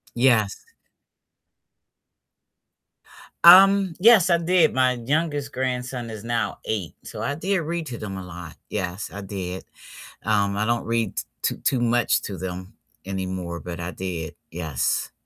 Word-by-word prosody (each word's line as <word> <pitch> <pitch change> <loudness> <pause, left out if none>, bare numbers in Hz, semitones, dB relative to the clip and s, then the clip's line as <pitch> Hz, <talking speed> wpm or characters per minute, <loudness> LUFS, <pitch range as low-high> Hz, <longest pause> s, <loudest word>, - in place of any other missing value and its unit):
Yes. 120 -5 +3 2.9
Um, 190 0 +8
yes, 205 -3 +6
I 170 - +5
did. 170 -1 +3
My 130 -1 +3
youngest 145 +3 -1
grandson 125 -2 -3
is 110 -1 -8
now 115 -3 -2
8, 100 -7 -3
so - - -7
I 140 - -1
did 185 +5 -1
read 165 0 -3
to 120 - -6
them 100 -3 -6
a 95 - -6
lot. 90 -2 -9
Yes, 95 0 -3
I 100 - -7
did. 95 -2 -6 0.6
Um, 100 -2 +1
I 105 - 0
don't 120 +1 0
read 115 -3 -1
t - - -1 0.2
too - - 0
too 130 - 0
much 120 0 +2
to 100 -3 -6
them 90 0 -6 0.3
anymore, 95 -3 -4
but 90 -1 -7
I 85 +1 -4
did, 90 -5 -5 0.2
yes. 80 -5 -2
115 Hz, 145 wpm, -24 LUFS, 95-140 Hz, 2.9 s, Um